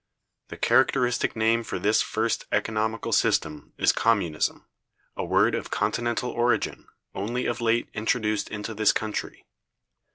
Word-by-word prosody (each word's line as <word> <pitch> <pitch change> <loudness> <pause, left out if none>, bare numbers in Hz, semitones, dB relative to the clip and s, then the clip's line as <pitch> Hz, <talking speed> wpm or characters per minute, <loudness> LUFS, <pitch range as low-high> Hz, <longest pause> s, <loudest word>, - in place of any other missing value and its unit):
The - - -9
characteristic 125 -1 +2
name 115 +1 +2
for 110 - -4
this 105 +4 +2
[first] 110 +1 -1
economical 110 +1 -1
system 75 -1 +1
is - - +4
Communism, 95 -9 0 0.5
a - - -3
word - - +3
of - - -3
Continental 120 +1 -1
origin, 120 -2 0 0.3
only 120 +6 -3
of 120 0 -2
late 115 0 +1
introduced 110 -1 -1
into 105 +1 -5
this 110 -1 +3
country. 110 -1 -4
110 Hz, 130 wpm, -26 LUFS, 105-115 Hz, 0.5 s, is